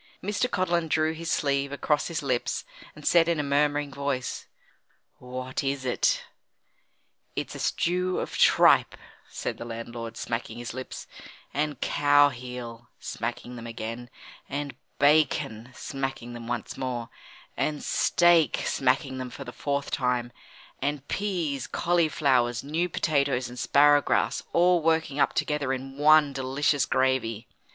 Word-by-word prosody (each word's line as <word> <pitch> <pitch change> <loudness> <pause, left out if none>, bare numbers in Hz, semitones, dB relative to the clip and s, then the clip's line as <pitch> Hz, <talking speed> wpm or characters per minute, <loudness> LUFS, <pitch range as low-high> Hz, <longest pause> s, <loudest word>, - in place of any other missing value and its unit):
Mr. 210 +6 0
Codlin 175 -5 0
drew 155 0 +1
his 165 +1 -4
sleeve 140 -1 0
across 145 +1 0
his 165 -3 -3
lips, 125 -3 -1 0.3
and 150 - -12
said 170 -1 +5
in 170 -2 +1
a - - +1
murmuring 145 0 +1
voice: 140 -2 -3 0.7
"What 130 +1 -5
is 135 -1 -2
it?" 125 - +1 1.1
"It's - - -3
a - - -7
stew 180 +1 0
of - - -4
tripe," - - +5 0.3
said - - -4
the - - -5
landlord, 115 0 -6
smacking 115 -1 -4
his 120 -1 -6
lips, 130 +1 -7 0.5
"and 145 -2 -1
cow 145 0 +4
heel," 120 -2 -8
smacking 125 +1 -5
them 115 0 -7
again, 115 +1 -6 0.4
"and 140 -2 -4 0.2
bacon," 140 -6 +2
smacking 135 -3 -4
them 115 -1 -8
once 120 -1 -4
more, 125 -3 -3 0.5
"and 150 -1 -1
steak," 175 -3 +3
smacking 130 0 +1
them 130 -1 -4
for 140 - -8
the 125 -2 -9
fourth 140 -1 -2
time, 125 -2 0 0.5
"and 145 0 -2
peas, 170 - -2
cauliflowers, 140 -8 +1
new 165 +5 -1
potatoes, 140 -6 0
and 125 0 -9
sparrow 145 0 +5
grass, - - +1
all 175 0 +4
working 160 -3 +1
up - - +3
together 150 -3 0
in 135 +1 -4
one 150 -1 +6
delicious 135 +1 +1
gravy." 125 -4 0
140 Hz, 140 wpm, -27 LUFS, 125-150 Hz, 1.1 s, one